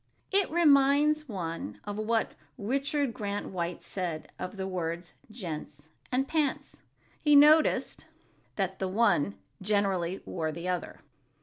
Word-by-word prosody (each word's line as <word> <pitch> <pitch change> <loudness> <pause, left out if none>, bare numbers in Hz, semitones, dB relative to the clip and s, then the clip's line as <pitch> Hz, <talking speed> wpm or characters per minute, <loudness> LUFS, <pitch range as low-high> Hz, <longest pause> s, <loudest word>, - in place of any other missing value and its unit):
It 395 0 +3
reminds 300 -1 +4
one 165 - -5
of 205 0 -5
what 220 +2 0 0.3
Richard 275 +4 -1
Grant 205 -4 -3
White 170 -2 -3
said 170 -3 -4
of 185 +2 -5
the 190 - -3
words 175 -1 -4 0.2
"gents" 160 - -7 0.2
and 265 +2 +1
"pants"—he 295 0 -1
noticed 305 +2 +5 0.5
"that 190 -2 -2
the 190 - -1
one 190 - +2 0.3
generally 195 -3 0
wore 160 -3 -2
the 170 +3 -6
other." 180 -1 -3
200 Hz, 120 wpm, -29 LUFS, 175-275 Hz, 0.5 s, noticed